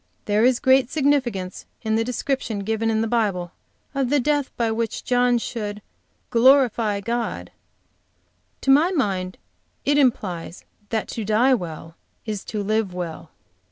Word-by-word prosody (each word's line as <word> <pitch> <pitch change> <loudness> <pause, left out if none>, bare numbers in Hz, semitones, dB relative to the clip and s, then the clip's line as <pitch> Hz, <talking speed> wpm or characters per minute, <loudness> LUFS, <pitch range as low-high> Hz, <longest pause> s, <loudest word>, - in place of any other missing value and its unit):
There 210 +1 +2
is 250 0 +4
great 260 -1 +4
significance 255 -11 0 0.2
in 220 -1 0
the 225 +1 +2
description 245 -3 -2
given 220 +2 -1
in 220 0 +1
the 225 - 0
Bible 200 -7 0 0.4
of 270 -3 0
the 290 +1 +3
death 290 +1 +1
by 230 -2 +1
which 225 0 -2
John 245 -1 +3
should 210 -3 -4 0.5
'Glorify 235 -4 +4
God'; 230 - -3 1.1
to 270 - +3
my 300 +6 +5
mind 195 - -1 0.5
it 290 +1 +3
implies 185 - -1 0.2
that 220 -1 -1
to 225 - -4
die 220 +6 +3
well 165 -6 -4 0.3
is 210 -3 -4
to 210 -2 -3
live 210 -2 0
well." 170 -2 -6
225 Hz, 145 wpm, -23 LUFS, 205-255 Hz, 1.1 s, my